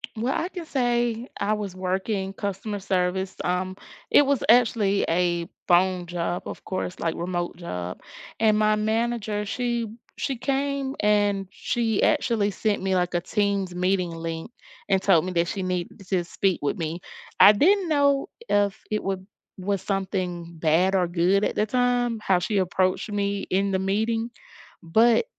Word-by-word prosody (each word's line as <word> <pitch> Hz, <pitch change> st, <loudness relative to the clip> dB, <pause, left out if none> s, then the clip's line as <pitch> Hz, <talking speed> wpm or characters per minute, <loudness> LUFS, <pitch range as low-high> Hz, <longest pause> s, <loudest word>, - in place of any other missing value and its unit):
Well, 240 Hz, +5 st, -1 dB
I 345 Hz, +3 st, -1 dB
can 350 Hz, -4 st, -7 dB
say 240 Hz, -3 st, 0 dB
I 205 Hz, +2 st, +1 dB
was 200 Hz, -3 st, -4 dB
working 190 Hz, +1 st, -2 dB
customer 200 Hz, +1 st, -4 dB
service. 190 Hz, 0 st, -1 dB
Um, 185 Hz, +1 st, -1 dB, 0.3 s
it 290 Hz, -, +6 dB
was 280 Hz, -2 st, +1 dB
actually 225 Hz, -4 st, +4 dB
a 175 Hz, 0 st, +1 dB, 0.2 s
phone 180 Hz, 0 st, +3 dB
job, 175 Hz, 0 st, -3 dB
of -, -, -7 dB
course, 185 Hz, -1 st, -4 dB
like 165 Hz, -1 st, 0 dB
remote 175 Hz, 0 st, -3 dB
job, 90 Hz, -, -5 dB, 0.4 s
and 215 Hz, -1 st, +4 dB
my 215 Hz, 0 st, +3 dB
manager, 220 Hz, -1 st, -1 dB
she 235 Hz, +1 st, -1 dB, 0.3 s
she 270 Hz, -, -1 dB
came, 275 Hz, +1 st, -1 dB
and 205 Hz, -2 st, +2 dB
she 230 Hz, -4 st, -1 dB
actually 230 Hz, -9 st, +2 dB
sent 205 Hz, +1 st, -1 dB
me, 190 Hz, -1 st, 0 dB
like, 180 Hz, -1 st, 0 dB
a 175 Hz, -, +1 dB
Teams 200 Hz, -2 st, -1 dB
meeting 180 Hz, -1 st, +1 dB
link 165 Hz, +3 st, -5 dB, 0.4 s
and 190 Hz, -1 st, +4 dB
told 185 Hz, -4 st, +4 dB
me 185 Hz, -, -3 dB
that 170 Hz, 0 st, +1 dB
she 195 Hz, -, -3 dB
needed 180 Hz, 0 st, -3 dB
to 185 Hz, -3 st, +1 dB
speak 185 Hz, +1 st, 0 dB
with 145 Hz, -, 0 dB
me. 165 Hz, +1 st, -4 dB, 0.4 s
I 205 Hz, -, +10 dB
didn't 365 Hz, -, +3 dB
know 280 Hz, -2 st, +2 dB, 0.2 s
if 205 Hz, 0 st, +1 dB
it 215 Hz, 0 st, -1 dB
would 190 Hz, 0 st, -3 dB, 0.3 s
was 200 Hz, +1 st, -1 dB
something 180 Hz, -4 st, -3 dB
bad 170 Hz, +5 st, +3 dB
or 180 Hz, -2 st, +2 dB
good 180 Hz, +4 st, +2 dB
at -, -, +1 dB
the 210 Hz, -, +2 dB
time, 245 Hz, -1 st, +1 dB
how 185 Hz, -3 st, +2 dB
she 205 Hz, +3 st, -1 dB
approached 185 Hz, +2 st, 0 dB
me 200 Hz, -1 st, -1 dB
in 195 Hz, +1 st, +2 dB
the 190 Hz, -, +1 dB
meeting, 220 Hz, +4 st, 0 dB, 0.5 s
but 225 Hz, -, +4 dB
195 Hz, 165 wpm, -25 LUFS, 180-225 Hz, 0.5 s, I